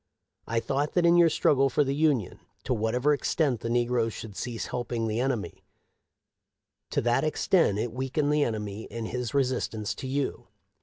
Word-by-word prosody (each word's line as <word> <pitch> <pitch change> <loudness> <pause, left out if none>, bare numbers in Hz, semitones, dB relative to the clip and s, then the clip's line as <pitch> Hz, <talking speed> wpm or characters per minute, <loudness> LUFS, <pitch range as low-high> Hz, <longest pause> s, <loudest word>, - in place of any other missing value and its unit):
" - - -58
I 115 +1 +1
thought 140 +5 -1
that 175 -1 +3
in 170 0 +6
your 170 -1 +6
struggle 135 -3 +3
for 145 - +2
the 135 0 -1
Union, 140 - +1 0.2
to 130 - 0
whatever 125 +6 +1
extent 140 -3 0
the 115 - -4
negroes 120 -1 +1
should 105 -3 -8
cease 120 +1 -4
help 120 -1 -5
ing 115 -2 -1
the 110 +1 -1
enemy, 125 -4 -2 1.3
to - - 0
that 120 +5 +2
extent 155 - +2
it 115 +2 -2
weakened 135 +3 0
the 150 -1 +3
enemy 105 -2 -3
in 115 -1 -6
his 125 +1 -4
resistance 125 -5 0
to 130 - -7
you. 140 +1 -2
125 Hz, 185 wpm, -27 LUFS, 115-145 Hz, 1.3 s, in